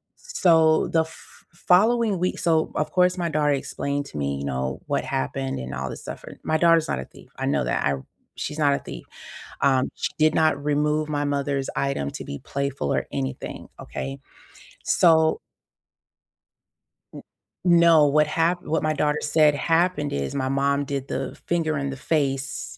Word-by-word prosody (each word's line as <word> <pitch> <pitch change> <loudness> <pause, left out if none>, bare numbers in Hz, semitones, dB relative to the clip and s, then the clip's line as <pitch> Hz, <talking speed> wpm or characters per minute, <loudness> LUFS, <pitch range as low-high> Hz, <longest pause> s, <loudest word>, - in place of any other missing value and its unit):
So, 160 -3 +3
the 165 - +3
f 160 - -16
following 215 +3 +3
week 180 +1 -1
so, 160 -2 +1
of 155 - -1
course, 180 0 +3
my 170 -1 -1
daughter 150 -1 +2
explained 140 +1 -3
to 75 - -9
me, 70 -1 -1
you 70 - -5
know, 65 0 -3
what - - -1
happened 65 0 -3
and 65 +1 -6
all 65 0 -4
this - - -7
stuff. - - -8 0.2
My 155 - +1
daughter's 165 -1 +4
not 65 - -2
a 65 - -6
thief, - - -18
I - - -2
know - - +1
that. - - -1
I 70 - +2 0.4
she's 150 - -4
not 145 -2 +4
a - - 0
thief. - - -9 0.6
Um, 130 -2 +3
she - - -3
did 155 0 +4
not 155 -3 +2
remove 150 +1 +1
my 145 -1 -1
mother's 140 -1 -1
item 140 - -1
to - - -7
be 70 - -6
playful 140 - -2
or - - -1
anything, 65 0 -5
okay? 135 0 -6 0.7
So 160 -2 +4 1.7
N - - -10 0.4
No, 170 -3 +6
what 150 +1 +3
hap 170 +3 0
what 160 +1 -1
my 155 0 +1
daughter 150 0 0
said 150 -1 +3
happened 165 -1 +1
is 70 - -3
my 130 -1 -1
mom 140 +1 +1
did 140 -1 -4
the - - -4
finger 160 -3 0
in 140 0 -2
the 135 - -6
face, 135 -2 -2
150 Hz, 175 wpm, -24 LUFS, 135-160 Hz, 1.7 s, No